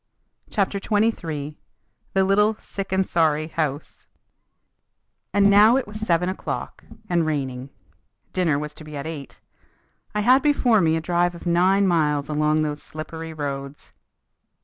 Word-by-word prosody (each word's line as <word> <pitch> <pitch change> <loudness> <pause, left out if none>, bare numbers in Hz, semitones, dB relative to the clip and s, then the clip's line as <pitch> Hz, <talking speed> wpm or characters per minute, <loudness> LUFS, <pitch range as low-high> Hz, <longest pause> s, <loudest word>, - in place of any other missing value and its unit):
CHAPTER 200 -1 0
XXIII 165 -9 -1 0.6
THE 195 - +4
LITTLE 210 +3 +3
"SICK 195 -1 -7
AND 190 0 +1
SORRY" 155 -2 +1
HOUSE 150 -3 -4 1.2
And 200 0 +4
now 210 +4 +6
it 270 - -1
was 210 +1 -8
seven 180 -5 +1
o'clock, 185 - -5 0.2
and 175 -3 +1
raining. 135 -4 -3 0.6
Dinner 170 -6 +1
was 150 0 -5
to 155 - -12
be 150 -1 -8
at 140 - -5
eight. 155 -4 -8 0.7
I 210 - +1
had 255 +5 +5
before 255 -7 +3
me 160 -2 +2
a - - -3
drive 175 +1 0
of 170 - -11
nine 185 +3 +3
miles 150 -5 +1
along 150 +1 +1
those 150 -1 -3
slippery 160 +1 -7
roads. 140 -2 -6
165 Hz, 145 wpm, -23 LUFS, 150-200 Hz, 1.2 s, now